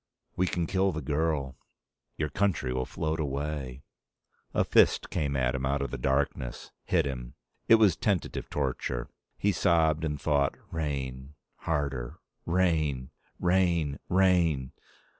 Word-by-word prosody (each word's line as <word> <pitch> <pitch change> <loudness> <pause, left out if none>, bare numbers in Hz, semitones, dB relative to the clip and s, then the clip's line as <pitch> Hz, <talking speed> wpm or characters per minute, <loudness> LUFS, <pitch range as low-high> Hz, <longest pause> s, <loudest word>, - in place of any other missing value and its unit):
"We 90 - +1
can 85 -1 -1
kill 95 +2 +1
the 80 -3 -5
girl." 75 -2 -1 0.6
"Your 75 -1 -1
country 80 -6 0
will 65 0 -2
float 80 0 -2
away." 70 -2 -3 0.7
A - - +2
fist - - +3
came 70 -3 -1
at 65 -1 +1
him 65 -1 -3
out 70 +1 0
of 70 - -4
the 70 - -3
darkness. 65 -2 -1
Hit 85 -4 +2
him. 60 -3 -5 0.3
It 115 - +8
was 105 -6 +5
tentative 100 -7 -1
torture. 65 -3 -2 0.3
He 100 - +2
sobbed 80 -3 +2
and 75 -2 -2
thought: 70 -1 +1 0.2
rain, 70 -3 -4 0.3
harder. 70 -6 -1 0.3
Rain, 80 -7 +1 0.3
rain, 85 -5 +2
rain 90 -8 +3
75 Hz, 135 wpm, -29 LUFS, 65-85 Hz, 0.7 s, It